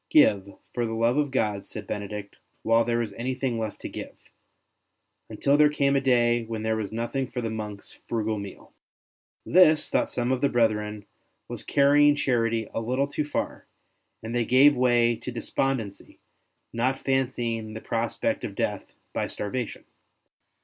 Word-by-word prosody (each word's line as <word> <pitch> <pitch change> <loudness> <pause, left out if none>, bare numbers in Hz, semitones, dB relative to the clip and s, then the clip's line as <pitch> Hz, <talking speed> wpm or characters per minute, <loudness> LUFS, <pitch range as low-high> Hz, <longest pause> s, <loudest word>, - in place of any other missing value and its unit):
'' - - -53
Give, 100 -1 +4 0.2
for 120 - -1
the 115 - -3
love 115 +3 +2
of 150 -1 +1
God,'' 105 -6 -1
said 105 -2 -7
Benedict, 105 0 -6
" - - -44
while 115 +1 +4
there 120 0 0
is 105 -3 -6
anything 125 +1 -2
left 110 -2 -4
to - - -5
give - - -8 0.6
''; - - -52
until 140 +1 +2
there 150 0 +6
came 140 -2 +1
a 135 - +3
day 120 -2 +3
when 110 -1 -5
there 110 0 +1
was 105 -3 -4
nothing 120 +4 -2
for 125 - -4
the 115 -2 -2
monks' 105 -2 -7
frugal 110 -2 -1
meal. 100 -1 -10 0.7
This, 160 -3 +5
thought - - +1
some 120 +1 -1
of 130 - 0
the 140 - +3
brethren, 105 -3 0 0.4
was - - -7
carrying 145 +1 +4
charity 115 -5 0
a - - -2
little 130 +5 0
too 145 +1 -2
far, 150 - -4 0.6
and 115 +1 -5
they 120 - +2
gave 135 +5 +6
way 120 -2 +3
to 120 +3 -6
despondency, 120 -3 -3 0.6
not 125 +3 0
fancying 120 -5 -1
the - - -4
prospect 115 0 -1
of - - -5
death - - -3 0.2
by - - -1
starvation. 115 +3 -4
120 Hz, 170 wpm, -26 LUFS, 110-130 Hz, 0.7 s, there